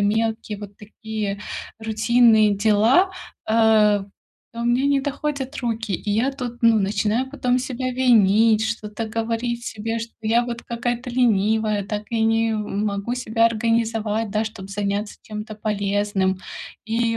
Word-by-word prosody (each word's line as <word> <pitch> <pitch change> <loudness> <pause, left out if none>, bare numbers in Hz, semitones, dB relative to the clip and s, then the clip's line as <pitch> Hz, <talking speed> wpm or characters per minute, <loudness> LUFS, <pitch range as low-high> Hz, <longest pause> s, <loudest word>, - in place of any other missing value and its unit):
мелкие 220 +1 0
вот 205 -1 -10
такие 210 -1 -5 0.4
рутинные 220 -1 +4
дела, 220 - +4 0.4
э, 220 -2 +4 0.5
то 235 - -7
у - - -2
меня 245 +3 +2
не 280 -1 +3
доходят 285 0 -3
руки, 225 -3 -2
и 205 +3 -3
я 230 +7 +1
тут, 245 -3 -6
ну, 230 -3 +4
начинаю 215 +6 0
потом 250 -3 0
себя 255 0 -3
винить, 220 -3 +4
что-то 220 -1 -4
говорить 230 +2 -2
себе, 225 +1 -3
что 230 +1 -7
я 230 +2 +2
вот 235 -1 -5
какая-то 240 +1 -3
ленивая, 220 -3 +1
так 210 +1 -4
я 230 -1 0
не, 225 0 +2
м, 210 -1 -2
могу 200 +3 -2
себя 230 -2 +2
организовать, 225 -1 0
да, 215 +1 0
чтобы 210 -3 -7
заняться 200 +1 -3
тем-то 215 0 -7
полезным. 205 -2 0 0.5
И 230 +1 0
225 Hz, 145 wpm, -22 LUFS, 210-235 Hz, 0.5 s, рутинные